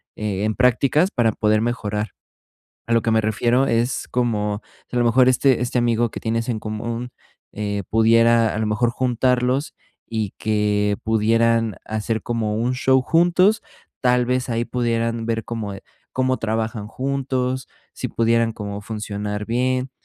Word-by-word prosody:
e 105 -2 -2
en 110 - +1
prácticas 135 +7 +3
para 115 -3 +2
poder 110 0 +1
mejorar. 110 -3 -2 0.8
A 115 - -2
lo 115 -1 +3
que 115 - 0
me 110 - +4
refiero 120 +5 +1
es 115 +2 0
como 105 -4 -1 0.3
si - - -5
a - - +3
lo - - +3
mejor 125 +2 +5
este 130 -1 +3
este 125 0 -1
amigo 120 -1 +1
que - - -6
tienes 115 +1 -2
en 115 -3 -1
común, 115 +3 -4 0.4
eh, 100 -1 -3
pudiera 115 +1 +4
a - - -2
lo 110 - 0
mejor 105 +3 +1
juntarlos 125 +2 0 0.3
y 110 -3 -2
que 105 -1 +1
pudieran 115 0 +2
hacer 110 0 -2
como 110 -3 -2
un 120 +3 0
show 130 0 +3
juntos, 175 - +3 0.4
tal 125 -1 +2
vez 125 0 0
ahí 115 0 0
pudieran 115 -2 -1
ver 115 -1 -1
cómo, 110 -4 -4
eh, 95 - -10 0.3
cómo 130 0 +1
trabajan 110 -1 -2
juntos, 130 0 -2 0.3
si - - -3
pudieran 115 0 +1
como 105 -2 -6
funcionar 105 -1 -4
bien, 125 +2 0
115 Hz, 160 wpm, -22 LUFS, 110-125 Hz, 0.8 s, mejor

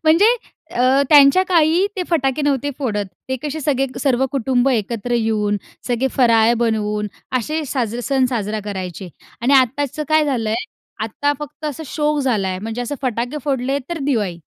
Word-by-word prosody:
म्हणजे 380 +10 +5 0.4
अ, 255 +3 +4
त्यांच्या 290 +4 +7
काळी 340 +2 +4
ते 370 - 0
फटाके 280 -2 +1
नव्हते 285 0 0
फोडत. 210 -7 -1 0.2
ते 260 - -1
कसे 305 +1 -3
सगळे 270 -2 +1
सर्व 265 -2 +2
कुटुंब 260 0 +1
एकत्र 230 0 -2
येऊन, 215 -3 +1 0.3
सगळे 250 +2 0
फराळ 230 -3 +5
बनवून, 210 -2 0 0.3
असे 305 +6 -3
साजरा 245 -3 -2
सण 265 -2 +3
साजरा 215 -2 -2
करायचे 185 -2 -5 0.3
आणि 245 +4 +2
आत्ताचं 275 +3 +2
काय 310 0 +4
झालंय, 230 -6 0 0.5
आत्ता 285 +6 -1
फक्त 295 +1 -9
असं 305 +1 -4
शौक 300 +1 0
झाला 220 -8 0
आहे, 185 0 -3
म्हणजे 225 +4 -5
असं 265 +4 -3
फटाके 245 +3 -2
फोडले 270 -1 0
तर 340 - -2
दिवाळी. 210 -11 -1
255 Hz, 160 wpm, -19 LUFS, 225-290 Hz, 0.5 s, त्यांच्या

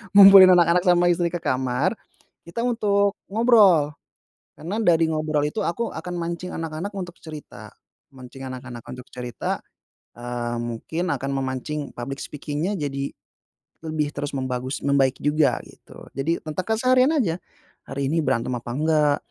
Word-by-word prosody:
ngumpulin 195 -2 +10
anak-anak 175 0 +4
sama 175 0 +4
istri 175 -1 +1
ke 175 - -3
kamar, 130 - 0 0.5
kita 170 +7 -5
untuk 200 -3 +1 0.2
ngobrol. 200 -10 +5 0.6
Karena 175 +7 -4
dari 165 -4 +4
ngobrol 155 -1 0
itu 210 +8 -3
aku 230 +7 -1
akan 170 +3 -6
mancing 170 +2 -4
anak-anak 165 +5 -4
untuk 180 -3 -6
cerita. 155 -2 -10 0.4
Mancing 130 0 -11
anak-anak 125 -2 -9
untuk 125 0 -9
cerita, 125 -1 -4 0.6
eee, 120 0 -4
mungkin 160 +10 -3
akan 135 - -4
memancing 135 +2 -3
public 135 +3 -5
speaking-nya 150 +6 -3
jadi 140 -2 -3 0.7
lebih 155 -2 -2
terus 145 - -4
membagus 130 0 -3
membaik 135 -2 +2
juga, 150 +1 +3
gitu. - - -15
Jadi, 155 +6 -2
tentang 160 +4 -4
keseharian 255 +5 +3
aja, 175 - +1 0.5
"Hari 135 0 -2
ini 165 - +1
berantem 120 -2 0
apa 120 0 -9
enggak? 150 -1 +2
155 Hz, 140 wpm, -23 LUFS, 135-180 Hz, 0.7 s, ngumpulin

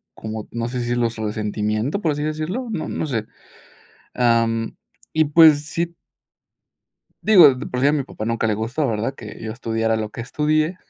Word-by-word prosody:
como, 110 -1 -6
no 115 0 -3
sé, 120 - -7
si - - -1
decirlo, 120 -1 0
su 110 -1 -5
resentimiento, 105 - -1
por 160 -5 +1
así 145 0 -3
decirlo, 155 +11 -3
no 190 -8 -3
no 160 - -3
sé. 115 -6 -2 0.9
Ah, 115 -2 +3
mm, 115 0 -3 0.4
y, 160 - +4
pues, 150 -1 +6
sí 170 +2 -3 1.3
Digo, 180 -11 +7
de 130 +3 -6
por 125 - -3
si 140 - +4
a 145 - +4
mi 150 -2 +1
papá 110 -4 -7
nunca 115 -1 0
le 110 - +1
gustó, 120 +8 -1
¿verdad?, 115 +3 -2
que 110 -4 -10
yo 110 -1 -4
estudiara 115 -1 -1
lo 110 -1 -3
que 115 - -8
estudié. 155 +7 0
120 Hz, 195 wpm, -21 LUFS, 110-155 Hz, 1.3 s, Digo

